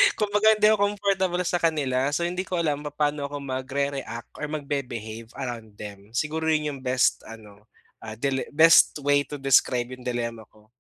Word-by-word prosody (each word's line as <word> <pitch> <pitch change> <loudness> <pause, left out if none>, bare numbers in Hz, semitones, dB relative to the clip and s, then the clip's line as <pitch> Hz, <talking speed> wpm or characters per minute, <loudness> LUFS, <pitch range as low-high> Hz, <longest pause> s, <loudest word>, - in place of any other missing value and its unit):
Kumbaga 210 +1 +3
hindi 210 0 +4
ako 205 -1 +2
comfortable 190 -3 0
sa 175 - 0
kanila, 140 -5 +1
so 170 - -1
hindi 180 +2 -2
ko 185 - -3
alam 150 -4 0
papaano 145 0 -1
ako 145 0 -6
mag-re-react 135 -2 -4
or 150 - -3
mag-be-behave 125 -7 -5
around 115 -5 -6
them. 100 0 -10
Siguro 160 +3 -1
'yun 150 -1 +1
'yung 135 - -11
best 125 0 +2
ano, 105 -1 -13 0.3
ah, 110 -1 -7
dile 135 +1 -1
best 165 +1 +7
way 145 0 +3
to 150 - -6
describe 130 -2 +2
'yung 125 -1 -10
dilemma 115 -2 -3
ko. 110 +1 -24
140 Hz, 170 wpm, -25 LUFS, 120-160 Hz, 0.3 s, best